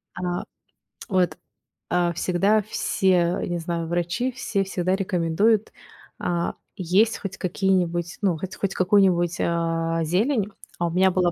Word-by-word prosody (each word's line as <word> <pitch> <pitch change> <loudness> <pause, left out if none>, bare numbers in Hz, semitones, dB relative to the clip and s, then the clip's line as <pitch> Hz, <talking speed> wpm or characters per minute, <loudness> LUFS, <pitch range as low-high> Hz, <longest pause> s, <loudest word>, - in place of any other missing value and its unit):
А, 180 -1 -3 0.7
вот, 185 -3 +1 0.5
а, 175 -1 +1
всегда 195 +5 +2
все, 185 -3 +1
не 175 - -2
знаю, 170 0 -3
врачи, 175 +9 -1
все 225 -5 -1
всегда 185 -1 0
рекомендуют, 195 +3 +1 0.5
а, 170 -1 -1 0.2
есть 195 +5 +2
хоть 195 -1 -6
какие-нибудь, 180 -2 0
ну, 185 -5 +1
х 190 - -4
хоть 195 -1 -1
какую-нибудь, 180 -2 +3
а, 165 -1 0
зелень. 205 - +1 0.3
А 170 - +1
у - - -3
меня 190 +2 +4
была 180 -1 +2
180 Hz, 135 wpm, -24 LUFS, 170-195 Hz, 0.7 s, меня